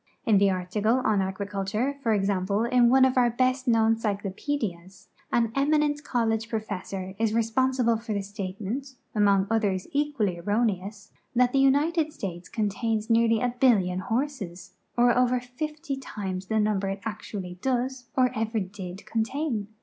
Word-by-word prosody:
In 215 -4 +5
the 200 0 +4
article 195 +5 0
on 210 -2 +3
agi'iculture, 200 +7 -2
for 230 - +1
example, 200 0 +1
in 240 0 +4
one 260 +1 +6
of 260 0 +1
our 245 -1 +5
best 255 +2 0
known 225 -1 +4
cyclo])edias, 200 - -4 0.2
an 230 -2 +2
eminent 295 +1 +1
college 225 -3 0
professor 195 -4 -4
is 225 -1 +1
re 230 - +3
s])onsible 235 0 +1
for 230 -1 -6
the 200 -1 -1
statement, 205 +7 -5 0.2
among 200 -2 +3
others 205 -4 +1
equally 280 - 0
erroneous, 205 0 -1 0.2
that 250 0 +3
the 275 - +3
United 300 +4 +3
States 180 - -6
contains 220 +1 -1
nearly 230 -1 +4
a 245 -1 0
billion 190 -8 +3
horses, 225 -5 -3 0.2
or'over 245 +1 +4
fifty 300 +4 -5
times 195 -8 -5
the 220 +1 +1
num 210 -1 +2
ber 195 0 -2
it 195 0 -4
actually 200 -4 -6
does 255 0 -1
or 255 -1 +4
ever 225 0 -1
did 190 -1 -7
contain. 230 -1 -2
225 Hz, 150 wpm, -26 LUFS, 195-250 Hz, 0.2 s, one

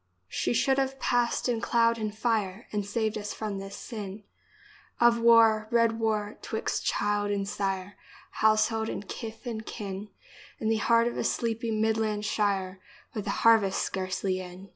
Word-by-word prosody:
She - - -1
should 265 +3 +2
have 270 0 -1
passed 245 -1 +1
in 235 -2 0
cloud 230 +1 +2
and 215 -1 -2
fire 220 -3 -1
And 210 -1 -1
saved 220 +1 -1
us 210 0 -5
from 210 -3 -4
this 195 0 -7
sin 205 -3 -7 0.8
Of 235 0 +5
war 225 -2 +5
— - - -28
red 230 -1 +4
Avar 220 -2 -1
— - - -34
'twixt 220 - -2
child 205 0 0
and 200 -1 -1
sire, 195 -1 -3 0.3
Household 220 +1 +2
and 205 - -5
kith 225 +2 -7
and 225 -2 -4
kin, 205 -2 -6 0.5
In 220 - -1
the 225 - +2
heart 230 +2 +3
of 240 - -3
a - - 0
sleepy 230 0 -1
Midland 220 -1 0
shire, 195 -3 0 0.3
With 210 - -4
the - - -3 0.2
harvest 220 -4 +5
scarcely 185 0 -2
in. 185 +1 -9
215 Hz, 170 wpm, -28 LUFS, 200-230 Hz, 0.8 s, Of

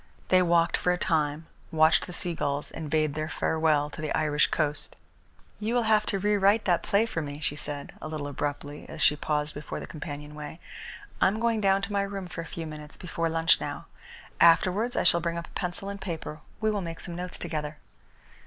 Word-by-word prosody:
They 185 0 +6
walked 170 -1 +3
for 180 - +2
a 180 - +1
time, 155 -3 0 0.3
watched 160 0 +4
the - - -7
seagulls, 160 -5 -2
and 160 -2 -6
bade 155 -1 +2
their 155 +1 -3
farewell 155 -3 +1
to - - -7
the 155 - -2
Irish 150 -1 +3
coast. 150 -2 -2 0.6
"You 220 +3 -1
will 240 - +3
have 215 -1 +3
to 200 - +1
re 205 +2 +2
write 200 +3 +4
that 175 -3 +3
play 205 +3 +3
for 170 -8 -3
me," 145 -1 -5
she 145 -1 -1
said, 145 -1 -4
a - - -5
little 155 -2 -4
abruptly, 145 +1 -4
as - - -8
she 150 - +5
paused 150 0 -1
before 145 - -5
the - - -6
companionway. 150 +1 -7 0.6
"I - - +7
am 205 +3 0
going 230 -2 +1
down 195 0 +3
to 205 - -3
my 200 - +2
room 200 -1 -3
for 175 -1 -6
a - - -7
few 165 0 -6
minutes 150 -1 -9
before 165 -2 -2
lunch 165 +1 +3
now. - - -4 0.5
Afterwards 185 +8 +5
I - - +2
shall 170 -1 +4
bring 170 0 -1
up 170 - -4
a - - -19
pencil 180 +1 -3
and 200 0 -5
paper. 160 -4 -5 0.2
We 215 0 +3
will 205 -2 -1
make 165 -2 -5
some 175 - -6
notes 180 0 -5
together." 150 -1 -4
165 Hz, 215 wpm, -28 LUFS, 150-190 Hz, 0.6 s, I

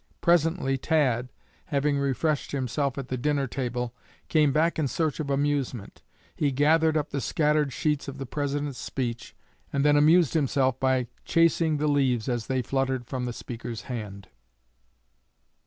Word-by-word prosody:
Presently 165 -5 +2
Tad, 130 -6 +1 0.4
having 140 0 0
refreshed 140 +2 -1
himself 135 +1 -1
at 135 -2 -5
the 130 - -2
dinner 140 +2 0
table, 125 -2 -3 0.4
came 150 -3 +4
back 160 +4 +1
in 150 - +1
search 150 +6 -1
of 150 -2 -3
amusement. 140 -6 -1 0.3
He 145 -2 +1
gathered 160 +3 +3
up 150 -1 -2
the 140 - -2
scattered 150 -1 +1
sheets 150 +1 -1
of 140 0 -6
the 135 - -5
President's 145 0 -3
speech, 120 -3 -4 0.4
and 140 +1 0
then 145 0 +5
amused 155 +2 +5
himself 135 -4 +1
by 130 -1 +2 0.2
chasing 165 -1 +2
the 150 - -1
leaves 130 -6 +1
as 120 -3 -2
they 130 -1 0
fluttered 130 0 -1
from 125 +1 -4
the 120 - -3
speaker's 115 -1 -7
hand. 105 -6 -6
140 Hz, 155 wpm, -26 LUFS, 125-150 Hz, 0.4 s, then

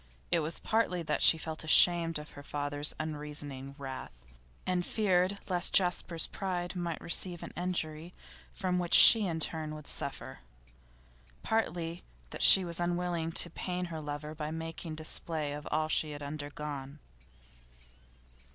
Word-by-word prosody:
It 170 - +2
was 160 +1 -3
partly 185 -6 -1
that - - -2
she 160 - +8
felt 160 0 -7
ashamed 165 +1 +7
of 150 0 -11
her 145 - -12
father's 145 0 -4
unreasoning 145 -3 -5
wrath, 130 - -9 0.4
and 180 -1 -1
feared 190 -1 0
lest 180 -2 +1
Jasper's 175 -3 +2
pride 180 -2 -5
might 170 -2 -4
receive 175 0 -1
an - - -9
injury 170 -2 -4 0.4
from 180 -1 -2
which 175 -1 +3
she 220 -4 +9
in 165 -2 -3
turn 155 -1 -3
would 150 -1 -11
suffer; - - -5 1.0
partly 175 -6 -2 0.3
that - - -8
she 190 -1 +8
was 170 -1 -6
unwilling 175 -1 -2
to 170 - +1
pain 180 +1 -5
her 160 - -6
lover 150 +1 -7
by 155 -1 -6
making 160 0 -7
display 155 -1 -1
of 150 0 -8
all 155 +1 -1
she 155 -1 0
had 145 0 -9
undergone. 145 -1 -7
160 Hz, 145 wpm, -30 LUFS, 150-175 Hz, 1.0 s, she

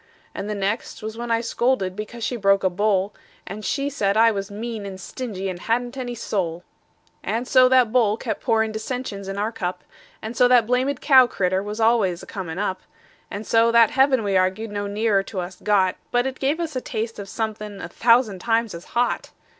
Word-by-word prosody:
And 205 - -5
the 210 - -2
next 205 +3 -3
was 220 0 -5
when 235 +1 -5
I 230 0 +2
scolded 235 -5 0
because 220 +3 -7
she 245 - -1
broke 195 -3 +3
a 185 - +2
bowl; 200 +1 +1 0.3
And 210 +2 -7
she 275 +5 -1
said 210 -8 0
I 230 +1 +6
was 195 -1 -4
mean 220 +1 -5
and 195 -1 -7
stingy, 195 -3 -5
and 180 -2 -4
hadn't 240 +5 -1
any 245 -2 -4
soul. 180 -7 -3 0.6
And 235 +3 -2
so 255 -1 +6
that 255 -3 +4
bowl 220 -4 +3
kept 220 -3 -4
pourin' 220 -1 +1
dissensions 220 -3 -5
in 195 0 -5
our 210 +2 -1
cup; 185 -5 -4 0.4
And 220 +2 -6
so 245 - +5
that 245 -2 +5
blamed 250 +3 0
cow 260 -4 +7
critter 185 -3 0
was 210 +2 -6
always 220 -6 +2
a - - -8
comin' 180 -4 -6
up; 190 -2 -2 0.5
And 205 +2 -6
so 230 +2 +4
that 230 -2 +6
heaven 265 -3 +3
we 200 -1 -1
arg'ed 190 +4 +1
no 205 0 -3
nearer 205 0 +1
to 195 0 -6
us 180 +1 -6
got, 190 -3 +2
But 245 0 +1
it 265 -1 -4
gave 285 +4 0
us 325 -4 -3
a 255 - -1
taste 225 -1 -4
of 200 -1 -7
somethin' 215 -2 -4
a - - -6
thousand 230 -4 +3
times 225 +2 0
as 170 0 -9
hot. 245 0 0
220 Hz, 210 wpm, -23 LUFS, 195-240 Hz, 0.6 s, cow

